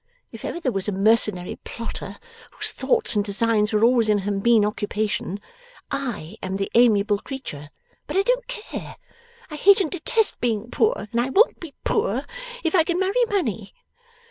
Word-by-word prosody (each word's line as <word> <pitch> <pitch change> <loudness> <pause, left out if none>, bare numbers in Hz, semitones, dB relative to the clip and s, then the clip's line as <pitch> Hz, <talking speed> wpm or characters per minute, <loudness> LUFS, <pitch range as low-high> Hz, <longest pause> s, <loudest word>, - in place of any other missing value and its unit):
If - - -11
ever - - -4
there 270 -7 -1
was 195 -3 -2
a - - 0
mercenary 200 -2 +3
plotter 230 -1 -7 0.4
whose - - -1
thoughts 470 - +1
and 205 - +2
designs 210 +1 +1
were 215 0 +1
always 235 -2 +4
in 210 - +4
her 205 - 0
mean 210 +2 +3
occupation, 210 -1 -2 0.5
I 235 - -4
am 190 0 -3
the 195 - -3
amiable 210 -3 +4
creature. 150 - -8 0.4
But - - -2
I 390 - +4
don't - - 0
care. - - -7 0.6
I - - -5
hate 400 +6 +6
and 355 -6 -1
detest 405 +5 +1
being 230 -1 -1
poor, 445 - +1
and 235 - +1
I 250 - -2
won't 425 - +3
be 325 -5 -10
poor 435 +3 0 0.4
if 330 - 0
I 345 -4 +5
can 345 +1 -1
marry 390 +6 +2
money. 225 - -2
230 Hz, 175 wpm, -23 LUFS, -, 0.6 s, hate